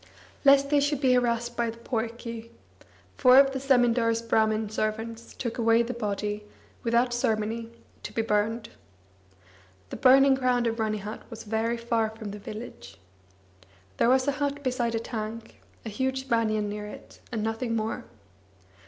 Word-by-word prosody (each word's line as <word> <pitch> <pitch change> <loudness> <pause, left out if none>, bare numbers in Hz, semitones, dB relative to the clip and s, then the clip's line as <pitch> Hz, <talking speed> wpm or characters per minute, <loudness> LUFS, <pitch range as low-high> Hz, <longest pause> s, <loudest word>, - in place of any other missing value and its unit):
Lest 280 0 +5
they 290 - +5
should 285 0 0
be 260 -3 +3
harassed 240 -1 +1
by 235 -1 0
the 225 - -8
poike, 230 -1 -4 0.7
four 255 -1 +7
of 275 0 +7
the 265 - -3
zemindar's 240 -3 +2
Brahmin 220 -1 +1
servants 225 +1 -3
took 235 -1 -4
away 230 0 +4
the 245 +2 -4
body, 210 -2 -3 0.4
without 235 +1 +2
ceremony, 225 0 -1 0.3
to - - -7
be 225 - -1
burned. 220 +1 0 1.2
The - - -5
burning 270 +1 +6
ground 250 -2 +1
of 230 0 -1
Ranihat 215 -1 -3
was 225 -2 -8
very 225 +2 -1
far 230 -1 0
from 220 -2 -8
the 205 - -8
village. 210 - -9 1.0
There - - +3
was 260 +1 +3
a - - +4
hut 285 0 -2
beside 245 -3 0
a - - 0
tank, 225 -1 -6 0.2
a - - -3
huge 265 +4 -2
banian 225 -3 +1
near 210 0 -5
it, - - -12
and 220 -3 -2
nothing 225 +1 -2
more. 220 0 -3
230 Hz, 155 wpm, -27 LUFS, 220-250 Hz, 1.2 s, four